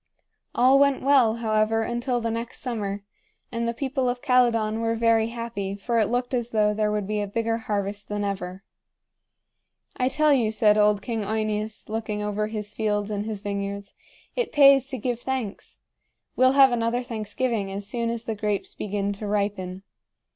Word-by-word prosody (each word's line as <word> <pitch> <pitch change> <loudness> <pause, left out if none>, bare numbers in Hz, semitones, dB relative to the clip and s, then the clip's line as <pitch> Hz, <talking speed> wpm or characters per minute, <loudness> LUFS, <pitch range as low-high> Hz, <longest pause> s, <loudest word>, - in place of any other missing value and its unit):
All 260 +3 +5
went 280 -1 +3
well, 260 -5 +4
however, 220 -1 +1
until 240 +2 -1
the 230 -1 -2
next 230 +1 -4
summer; 205 -5 -3 0.5
and 235 -1 -2
the - - +1
people 265 -1 -1
of 245 0 -2
Calydon 235 -5 +2
were 230 0 0
very 225 -1 +3
happy, 230 -4 -4
for 230 +3 -1
it 215 - +3
looked 245 +2 -1
as 240 -2 -1
though 210 -2 +2
there 210 0 0
would 210 -1 -1
be 210 +1 -1
a 205 - -2
bigger 225 +2 -1
harvest 205 -2 -3
than 205 0 -2
ever. 190 -1 -4 1.3
"I 255 0 +1
tell 305 +1 +3
you," 235 -5 +2
said 215 -1 +4
old 210 -1 +3
King 230 -3 -2
OEneus, 215 +1 -2
looking 215 -1 -3
over 210 0 -1
his 210 -1 -5
fields 210 -1 -1
and 205 +1 -3
his 210 -3 -4
vineyards, 200 0 -4 0.4
"it 485 -3 -1
pays 275 -2 +6
to 270 -2 -5
give 240 0 -2
thanks. 250 -5 -4 0.6
We'll 255 +1 +4
have 270 -1 +7
another 240 +1 0
thanksgiving 220 -2 -2
as 200 +1 -4
soon 230 +1 -1
as 230 -1 -3
the 225 - -3
grapes 210 -1 -2
begin 205 0 -2
to 205 +1 -6
ripen." 200 -2 -2
220 Hz, 175 wpm, -25 LUFS, 205-240 Hz, 1.3 s, have